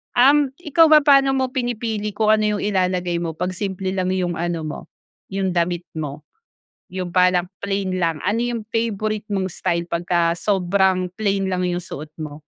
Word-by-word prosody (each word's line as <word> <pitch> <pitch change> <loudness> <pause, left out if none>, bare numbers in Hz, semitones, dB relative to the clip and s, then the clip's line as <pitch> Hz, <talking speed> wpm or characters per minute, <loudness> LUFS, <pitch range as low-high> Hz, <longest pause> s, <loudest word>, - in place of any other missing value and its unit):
Um, 280 +3 +5
ikaw 320 +2 +5
ba 305 -1 +6
paano 275 -2 +5
mo 260 -1 0
pinipili 225 -5 -2
kung 215 0 +1
ano 215 0 +2
'yong - - -4
ilalagay 180 -2 0
mo 165 -2 -3
'pag 180 +1 -2
simple 190 0 -3
lang 185 -1 -1
yung 180 -2 -1
ano 170 -1 -2
mo, 155 - -5 0.5
yung 195 -1 0
damit 175 0 0 0.2
mo? 150 -1 -5 0.7
Yung 185 -1 -3
parang 180 -1 +4 0.2
plain 195 -2 -1
lang 165 -2 0
ano, 210 +4 0
yung 240 -2 -2
favorite 215 -2 -1
mong 190 -1 0
style 170 +1 -2
'pagka 170 0 +1
sobrang 190 -1 +1
plain 195 -2 0
lang 185 0 -1
yung 175 0 -1
suot 150 +2 -8
mo? 150 0 -7
190 Hz, 170 wpm, -21 LUFS, 175-215 Hz, 0.7 s, ba